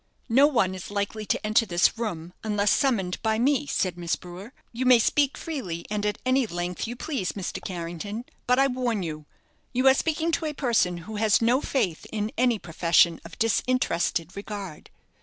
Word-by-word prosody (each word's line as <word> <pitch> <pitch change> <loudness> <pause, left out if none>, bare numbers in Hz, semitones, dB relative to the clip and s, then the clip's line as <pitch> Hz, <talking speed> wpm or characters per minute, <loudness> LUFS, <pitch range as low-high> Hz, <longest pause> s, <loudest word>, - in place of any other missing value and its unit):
"No 270 +5 +6
one 225 -10 +1
is 185 -2 -7
likely 205 +1 -3
to - - -1
enter 215 +2 +4
this 175 -3 +2
room, 180 -7 -4
unless 210 -1 +1
summoned 200 -10 +1
by 220 -1 +1
me," 280 +4 +2
said 180 -8 -1
Miss 170 -1 0
Brewer. 185 +5 -10 0.2
"You 240 +2 -3
may 250 -1 +7
speak 280 +4 +2
freely, 195 - -5
and 210 0 0
at 210 - -1
any 255 -1 +2
length 175 +2 -3
you 240 - -5
please, 245 - -3
Mr. 195 -3 -5
Carrington; 180 +6 -5 0.2
but 250 +1 +4
I 270 - +5
warn 250 -6 -1
you, 155 -2 -6 0.5
you 255 +2 +2
are 265 - +8
speaking 320 +3 0
to 325 - -1
a 300 - -3
person 235 -11 +1
who 220 0 -6
has 215 -1 +3
no 240 +4 +3
faith 185 - -1
in 215 0 -2
any 245 -1 +2
profession 170 -1 +2
of - - -11
disinterested 220 -7 0
regard." 200 -5 -7
215 Hz, 185 wpm, -26 LUFS, 180-255 Hz, 0.5 s, are